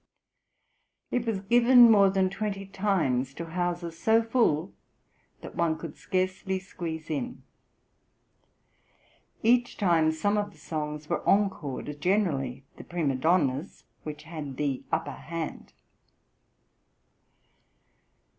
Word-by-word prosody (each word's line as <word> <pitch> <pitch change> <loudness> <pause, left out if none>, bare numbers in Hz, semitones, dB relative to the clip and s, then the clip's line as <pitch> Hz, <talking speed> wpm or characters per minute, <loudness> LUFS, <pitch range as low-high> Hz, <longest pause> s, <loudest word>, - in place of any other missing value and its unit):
It 245 -1 -1
was 210 -4 -1
given 240 +3 +7
more 200 -2 +6
than 190 -1 +1
twenty 195 0 -3
times 165 -10 0
to 170 - -5
houses 170 0 -3
so 225 +1 +4
full 210 -8 +1 0.7
"that - - -9
one 165 -2 +1
could 160 -2 -8
scarcely 185 +1 -1
squeeze 165 -4 -6
in." 245 - -4 2.0
Each 240 +2 +3
time 165 -5 +3
some 205 +7 +1
of 205 -1 -4
the - - -20
songs 150 -1 -5
were 170 - -1
encored, 150 -7 0
generally 145 -9 0
the - - -9
prima 165 -6 -1
donna's, 145 +2 0 0.2
which 150 0 -7
had 155 -4 -7
"the 140 -3 -1
upper - - -1
hand." 165 -1 -6
175 Hz, 110 wpm, -28 LUFS, 150-200 Hz, 2.0 s, given